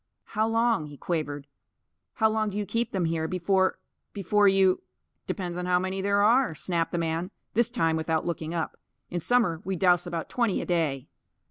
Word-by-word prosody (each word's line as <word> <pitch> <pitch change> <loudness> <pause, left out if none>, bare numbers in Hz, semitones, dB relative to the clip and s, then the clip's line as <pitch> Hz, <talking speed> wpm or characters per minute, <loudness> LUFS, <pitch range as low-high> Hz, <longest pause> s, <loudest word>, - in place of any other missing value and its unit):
"How 220 0 +2
long," 225 -7 +1
he 145 -1 -11
quavered, 145 -4 -3 0.7
"how 220 - +4
long 220 -1 0
do 205 - -5
you 210 - -1
keep 230 +3 -1
them 185 -3 0
here, 160 -1 -1
before 190 +2 +1 0.4
before 205 +1 +3
you 190 -1 +4 0.2
" - - -51
"Depends 180 -2 -3
on 180 - -3
how 180 0 +4
many 185 +1 -2
there 200 +1 +2
are," 235 -4 +4
snapped 165 +2 -1
the - - -1
man, 165 +2 -1 0.2
this 235 +1 +2
time 165 -10 +1
without 160 0 -1
looking 165 -2 -3
up. 170 -2 -3 0.3
"In 175 - -1
summer 185 -5 +2
we 190 +1 -2
dowse 180 0 +3
about 170 -2 -3
twenty 235 -6 0
a - - -4
day." 155 -7 0
180 Hz, 195 wpm, -27 LUFS, 165-205 Hz, 0.7 s, how